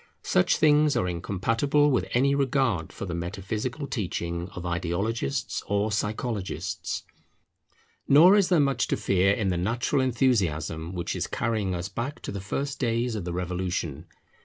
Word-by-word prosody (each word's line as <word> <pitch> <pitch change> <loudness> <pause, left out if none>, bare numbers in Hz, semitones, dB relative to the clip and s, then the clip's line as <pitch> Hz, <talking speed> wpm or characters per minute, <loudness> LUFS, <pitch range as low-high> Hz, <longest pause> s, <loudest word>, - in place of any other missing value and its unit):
Such 90 - +3
things 150 -1 +4
are 90 - +1
incompatible 115 - +1
with 130 - +1
any 140 +3 +3
regard 130 - +1
for - - -6
the 90 - -4
metaphysical 105 - -4
teaching 85 -7 -3
of 90 - -6
ideologists 85 -1 -2
or 100 +1 0
psychologists. 105 -5 -3 1.0
Nor 170 +8 +8
is 200 -3 +3
there 175 -3 +4
much 135 -4 +2
to - - 0
fear 95 0 +2
in 100 -1 0
the 90 - 0
natural 115 +9 0
enthusiasm 90 - 0
which 85 - -3
is - - -2
carrying 110 -6 -1
us 85 +1 -3
back 120 +8 -4
to - - -4
the 100 -1 -5
first 135 +7 -3
days 120 -1 0
of 105 -5 -4
the 90 - -3
Revolution. 90 -3 -3
100 Hz, 155 wpm, -26 LUFS, 90-130 Hz, 1.0 s, Nor